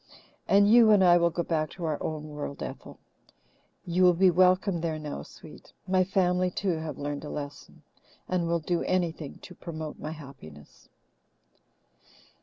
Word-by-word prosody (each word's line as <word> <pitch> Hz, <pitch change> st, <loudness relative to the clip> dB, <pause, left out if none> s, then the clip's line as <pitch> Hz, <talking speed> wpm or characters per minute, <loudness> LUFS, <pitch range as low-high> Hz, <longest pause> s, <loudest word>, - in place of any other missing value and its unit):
And 200 Hz, +1 st, +5 dB
you 230 Hz, +1 st, +7 dB
and 205 Hz, -3 st, +6 dB
I 175 Hz, -1 st, +6 dB
will 170 Hz, 0 st, +3 dB
go 170 Hz, +1 st, -2 dB
back 155 Hz, -2 st, -1 dB
to 175 Hz, -, -6 dB
our 155 Hz, -2 st, -2 dB
own 155 Hz, -1 st, -4 dB
world, 150 Hz, -1 st, -6 dB
Ethel. -, -, -8 dB, 0.9 s
You 175 Hz, +1 st, 0 dB
will 180 Hz, -1 st, +6 dB
be 185 Hz, +1 st, +5 dB
welcome 185 Hz, 0 st, +3 dB
there 160 Hz, -2 st, -2 dB
now, 150 Hz, -, -6 dB
sweet -, -, -14 dB
my 185 Hz, 0 st, +3 dB
family, 180 Hz, -1 st, +1 dB
too, 180 Hz, -1 st, -2 dB
have 160 Hz, -1 st, -6 dB
learned 145 Hz, 0 st, -4 dB
a 150 Hz, -, -7 dB
lesson, 145 Hz, -1 st, -8 dB, 0.4 s
and 180 Hz, -2 st, -1 dB
will 170 Hz, 0 st, +1 dB
do 170 Hz, +2 st, -1 dB
anything 170 Hz, -5 st, -2 dB
to 180 Hz, -, -10 dB
promote 160 Hz, -3 st, -7 dB
my 155 Hz, -, -5 dB
happiness." 135 Hz, -, -14 dB
170 Hz, 165 wpm, -27 LUFS, 155-185 Hz, 0.9 s, you